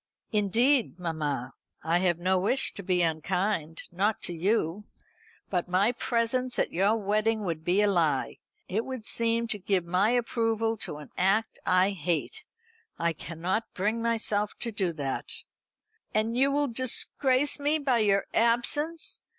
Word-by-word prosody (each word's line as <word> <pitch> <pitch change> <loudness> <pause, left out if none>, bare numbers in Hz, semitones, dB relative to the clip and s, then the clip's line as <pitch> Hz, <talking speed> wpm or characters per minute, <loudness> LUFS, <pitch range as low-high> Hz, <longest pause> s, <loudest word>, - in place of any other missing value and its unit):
"Indeed, 225 +4 +2
mamma, 150 -7 -3 0.3
I 165 +2 +2
have 175 -2 +1
no 185 +2 +1
wish 215 +8 +3
to 200 - -7
be 180 -2 +1
unkind 165 0 -1
not 205 +5 0
to 175 - +1
you. 190 +2 0 0.7
But 180 -2 -1
my 195 +5 +3
presence 245 +1 -1
at - - 0
your 195 +5 +3
wedding 215 +1 0
would 165 -5 -3
be 185 +5 +2
a - - +3
lie. 165 -8 0 0.3
It 215 +5 -1
would 260 -4 -6
seem 230 0 +2
to 210 - +1
give 190 -2 0
my 185 +5 +2
approval 225 -2 0
to 150 - -3
an 150 -2 -12
act 200 +5 +1
I 185 +2 +4
hate. 180 - -3 0.5
I 170 0 0
cannot 175 +7 -3
bring 210 +4 -1
myself 215 -3 -1
to 235 - 0
do 195 -4 -1
that." 140 -4 -4 0.9
"And 220 +2 +1
you 270 +3 +4
will 290 +1 +1
disgrace 260 +3 +1
me 295 +2 +1
by 270 -5 +1
your 200 -2 +2
absence? 275 +8 +1
205 Hz, 150 wpm, -28 LUFS, 180-230 Hz, 0.9 s, I